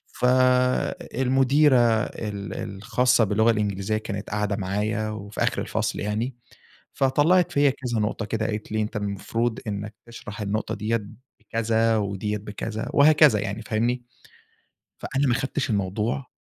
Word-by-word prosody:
فالمديرة 130 +2 +3 0.3
ال 100 -5 -5
الخاصّة 120 +5 +1
باللغة 110 +2 +3
الإنجليزية 105 -1 -1
كانت 100 -2 -5
قاعدة 105 -1 -1
معايا، 105 +3 -1
وفي 105 -1 -4
آخر - - 0
الفصل - - -2
يعني. 110 +5 -2 0.6
فطلّعت 150 +7 +3
فيّا 145 0 +4
كذا 125 -3 -3
نقطة 105 +2 -1
كده 110 0 -1
قالت 105 -1 -5
لي 110 0 +1
أنت 105 +1 -4
المفروض 105 +3 -2
إنَّك 105 0 -4
تشرح 115 -2 -9
النقطة 105 +2 -2
ديّة 110 +2 -1 0.4
بكذا 115 0 +1
وديّة 105 0 -2
بكذا 105 +2 -5
وهكذا 150 -5 +6
يعني 105 +1 -4
فاهمني، 120 +3 -1 0.9
فأنا 140 +1 -1
ما 125 - +3
أخدتش 135 +2 -1
الموضوع 105 +6 -1
110 Hz, 130 wpm, -24 LUFS, 105-125 Hz, 0.9 s, وهكذا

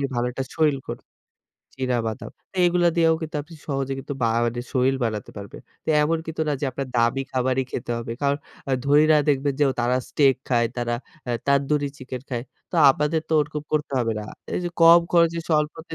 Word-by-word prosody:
ভালো 120 - 0
একটা 135 +2 -3
শরীর 155 -3 +3
ক - - -31 0.9
চীনা 130 -2 0
বাদাম। 110 +4 -5 0.2
তো 190 - -15
এগুলো 175 0 +3
দিয়েও 165 -1 +4
কিন্তু 155 -1 -3 0.3
সহজে 135 -2 -2 0.3
বা 115 - +3 0.2
মানি 120 +1 -1
শরীর 130 0 +2
বানাতে 110 -3 -3
পারবেন। 100 -1 -9 0.4
এমন 160 +2 +1
কিন্তু 160 0 -5
না - - +1
যে - - -1
আপনার 135 +2 -4
দামি 120 +3 +2
খাবারই 130 +1 +1
খেতে - - -5
হবে। 115 0 -5
কারণ 140 0 +2 0.3
আ - - -1
ধনিরা 150 +2 +5
দেখবেন 140 0 +2
যে - - +6 0.2
তারা 120 +1 +2
স্টেক 135 -3 +4
খায় 120 -2 +3
তারা 120 -1 -1 0.3
আ - - 0 0.2
তানদুরি 140 +1 +2
চিকেন 130 -1 -6
খায়। 120 -2 -3 0.3
তো - - -8 0.2
আপনাদের 150 +3 0
তো - - -3
ওরকম 150 0 -3
করতে 150 -2 0
হবে 115 -2 0
না। - - -5 0.3
এই - - 0
যে 175 - 0
কম 165 +1 +9
খরচে 170 -1 +4
স্বল্পতে 155 +1 -1
140 Hz, 190 wpm, -24 LUFS, 125-155 Hz, 0.9 s, কম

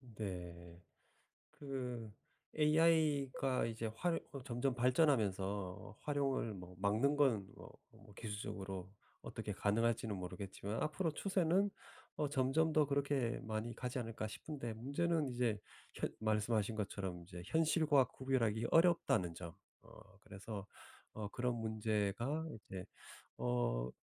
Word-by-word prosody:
네. 90 -4 -6 0.7
그 125 -6 -5 0.5
AI가 150 -4 +3
이제 115 0 -2
활 170 +5 +1
어 140 - -5
점점 125 0 0
발전하면서 105 - +1
활용을 135 -6 0
뭐 90 -1 -9
막는 110 +9 +3
건 120 -10 +3
뭐 - - -11 0.3
뭐 105 - -15
기술적으로 95 -4 -5 0.3
어떻게 - - -5
가능할지는 110 0 +1
모르겠지만 100 +3 -4
앞으로 160 +2 0
추세는 190 +3 +2 0.5
어 150 - 0
점점 145 +4 +2
더 155 -1 +5
그렇게 140 -3 +1
많이 110 +2 -3
가지 125 0 -3
않을까 115 -2 -3
싶은데 120 0 -5
문제는 145 +6 0
이제 120 -4 +1 0.3
현 - - -1
말씀하신 110 0 +1
것처럼 95 -4 -3
이제 90 0 -8
현실과 155 - +4
구별하기 115 -4 0
어렵다는 165 - +4
점. 85 -1 -7 0.3
어 95 - -16
그래서 100 0 -7 0.5
어 110 -1 -4
그런 125 +2 0
문제가 110 +6 0
이제 95 -4 -8 0.5
어 - - +1
115 Hz, 265 characters per minute, -38 LUFS, 100-140 Hz, 0.7 s, 더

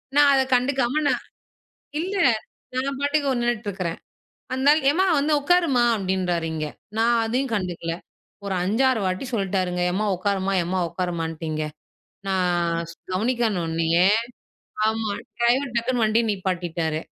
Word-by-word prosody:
நான் 290 -1 +7
அத 265 - +4
கண்டுக்காம 265 +2 +2
நான் - - +1 0.8
இல்ல, 380 +4 -2 0.6
நான் 270 +1 -1
பாட்டுக்கு 285 0 +1
ஒ - - +2
நின்னுட்டு 240 -2 -1
இருக்கிறேன். 180 -4 -4 0.6
அந்த 260 +2 -1
ஆள், 310 - +3
ஏம்மா, 365 +6 +2
வந்து 300 +2 +1
உட்காரும்மா, 295 -5 +3
அப்பிடின்றாரு 185 -4 -1
இங்க. 155 -1 -2 0.3
நான் 235 +1 +3
அதையும் 245 +2 -1
கண்டுக்கல. 175 -4 -2 0.5
ஒரு 200 -1 -2
5 215 +8 +1
6 230 -4 0
வாட்டி 185 +5 -2
சொல்ட்டாருங்க, 185 -3 0
எம்மா 210 +4 0
உக்காரும்மா 195 +1 0
எம்மா 185 +2 -1
உக்காரும்மான்டு 165 -2 -3
இங்க. 155 0 -2 0.6
நான் 175 -3 0
ஸ் 170 - -13 0.2
கவனிக்கல 225 +1 +1
உன்னயே 165 +2 +2 0.8
ஆமா. 220 0 0 0.3
டிரைவர் 245 +2 +2
டக்குன்னு 235 0 0
வண்டிய 220 +2 +3
நிப்பாட்டிட்டாரு. 175 -5 -2
205 Hz, 135 wpm, -24 LUFS, 180-255 Hz, 0.8 s, நான்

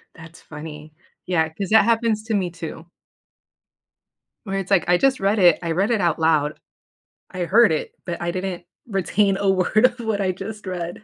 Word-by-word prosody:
That's 165 0 -14
funny. 150 0 -10 0.3
Yeah, 160 -3 +1
'cause 190 +3 -5
that 220 -1 +6
happens 225 -2 +1
to 220 - -3
me 185 -4 0
too 165 0 -8 1.6
where 195 -2 -3
it's 195 - -6
like, 195 - +3
I 175 0 +4
just 270 +3 +2
read 200 +2 +1
it, 175 -3 +6
I 165 - -2
read 195 +7 +1
it 215 -4 +1
out 170 -2 +1
loud, 155 -2 +1 0.7
I 180 -1 -4
heard 220 0 +5
it, 155 - -2
but 175 -1 -5
I 170 0 -1
didn't 185 -1 -5 0.2
retain 195 0 +1
a 200 -1 0
word 190 +5 +3
of 245 -1 +1
what 220 -3 -2
I 185 -1 +1
just 205 +3 -8
read. 180 +1 -5
185 Hz, 190 wpm, -22 LUFS, 170-210 Hz, 1.6 s, that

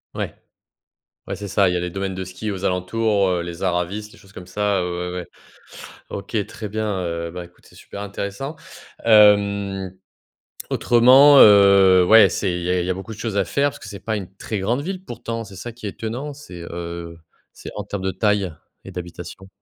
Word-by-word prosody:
Ouais, - - -3 1.0
ouais, 95 - -3
c'est 100 +2 -7
ça. 100 0 +3
Il 90 - 0
y - - 0
a - - 0
les 90 0 -3
domaines 95 +1 -4
de 95 0 -4
ski 95 +4 -6
aux 95 -1 -5
alentours, 100 +2 +1
heu, 90 -2 0
les 85 0 -7
Aravis, 95 +3 -1
les - - -17
choses 95 - -19
comme 90 - -10
ça. 100 +1 0
Heu, 90 0 -3
ouais, 90 - -4
ouais. 90 - -9 0.8
OK, 100 +1 -3
très 110 - -7
bien. 110 +1 -2
Heu, 85 -1 -4
bah, 90 0 -7
écoute, 85 +1 -22
c'est - - -19
super 100 - -9
intéressant. 100 +8 -5 0.5
Hem, 100 -3 +4 0.8
autrement, 130 +4 +6
heu, 100 -3 +7
ouais, 110 +3 +7
c'est 100 - -1
il 90 - -3
y 90 - -2
a 90 0 +1
il - - -3
y - - -4
a - - +2
beaucoup 95 +4 -8
de - - -12
choses 110 -2 -4
à 100 - +2
faire 140 +10 +1
parce - - -13
que - - -11
c'est 100 - -8
pas 110 +3 -3
une 95 -4 -6
très 105 0 -4
grande 120 +8 0
ville 185 +4 -5
pourtant? 115 -6 -5
C'est 100 -3 -12
ça 120 +6 -7
qui 115 -2 -8
est - - -2
étonnant. 120 +8 -5
C'est, 90 -11 -11
heu, 85 -1 -6 0.3
c'est - - -10
en 105 - -4
termes 100 -1 -5
de 95 - 0
taille 100 -2 0 0.3
et - - -9
d'habitation? 90 +1 -8
100 Hz, 215 wpm, -21 LUFS, 90-110 Hz, 1.0 s, heu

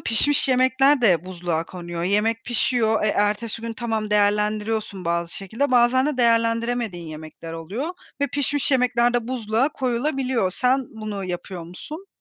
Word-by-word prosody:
pişmiş 275 +5 +3
yemekler 260 +2 +4
de 180 -8 +3
buzluğa 175 -3 -3
konuyor. 175 -1 -6
Yemek 210 +5 +1
pişiyor, 235 -2 +1
e, - - +2
ertesi 210 +2 0
gün, 230 0 -4
tamam, 225 -3 -3
değerlendiriyorsun 210 -1 0
bazı 170 0 -1
şekilde. 225 +9 -2
Bazen 250 +2 +4
de 300 -2 -1
değerlendiremediğin 230 -5 +1
yemekler 155 +1 -9
oluyor 190 - -4 0.3
ve 285 - +3
pişmiş 285 +1 0
yemekler 245 -2 +2
de 240 -1 0
buzluğa 235 +1 0
koyulabiliyor. 255 -5 -1
Sen 255 +5 +1
bunu 215 -3 -5
yapıyor 180 0 -5
musun? 300 - -9
225 Hz, 145 wpm, -23 LUFS, 195-250 Hz, 0.3 s, yemekler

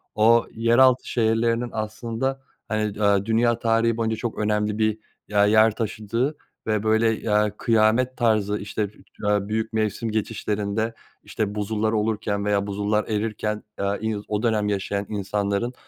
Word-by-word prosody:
O 115 +2 +5
yeraltı 120 +3 +4
şehirlerinin 115 +1 +1
aslında 115 +5 -3 0.3
hani, 105 -1 -2
aaa, 100 -1 +3
dünya 115 +1 +2
tarihi 115 0 +2
boyunca 110 -1 0
çok 115 0 -4
önemli 105 0 0
bir 110 0 +1 0.3
ya 105 -1 +3
yer 110 +1 +5
taşıdığı 115 +6 -2 0.3
ve 110 -1 0
böyle, 110 0 +2
eee, 105 -1 +1
kıyamet 115 +2 +2
tarzı, 105 -3 +2
işte, 105 0 -3 0.3
aaa, 105 -1 +1
büyük 110 +1 -2
mevsim 110 +1 -1
geçişlerinde, 110 0 -2 0.3
işte, 105 -1 -3
buzullar 110 +1 -1
olurken 105 -2 -1
veya 100 -1 +1
buzullar 105 +1 0
erirken, 105 0 -2
aaa, 100 0 -1
iz 110 -1 -3
o 105 +2 -2
dönem 110 -3 +1
yaşayan 100 0 -2
insanların 100 +3 -1
110 Hz, 140 wpm, -24 LUFS, 105-115 Hz, 0.3 s, O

